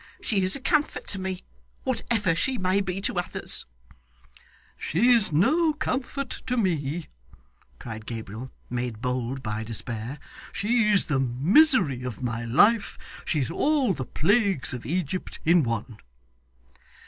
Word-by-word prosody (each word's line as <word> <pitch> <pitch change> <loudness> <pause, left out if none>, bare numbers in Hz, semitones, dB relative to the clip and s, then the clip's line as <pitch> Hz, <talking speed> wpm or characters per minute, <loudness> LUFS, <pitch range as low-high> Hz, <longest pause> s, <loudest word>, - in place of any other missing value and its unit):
She 205 -5 0
is 185 0 +1
a - - -4
comfort 300 +2 0
to 200 - +2
me, 185 -1 -4 0.4
whatever 225 -7 0
she 255 +10 0
may 185 0 +1
be 190 0 -3
to 190 - +1
others.' 175 - +1 1.1
'She's 225 +3 +3
no 305 - +3
comfort 275 -1 -3 0.2
to 250 0 0
me,' 165 - -1 0.7
cried 110 -2 -8
Gabriel, 115 +2 -6 0.2
made 120 -3 -4
bold 125 +1 -3
by 110 0 -3
despair. 115 +4 -2 0.4
'She's 210 0 +3
the 140 -3 0
misery 150 - +3
of 125 -2 -6
my 115 -1 -2
life. 205 - +3 0.3
She's 145 -7 -1
all 285 -7 +2
the 135 - -4
plagues 195 - +1
of 125 - -6
Egypt 180 +2 -3
in 170 +1 +5
one. 115 -3 -3
175 Hz, 130 wpm, -26 LUFS, -, 1.1 s, in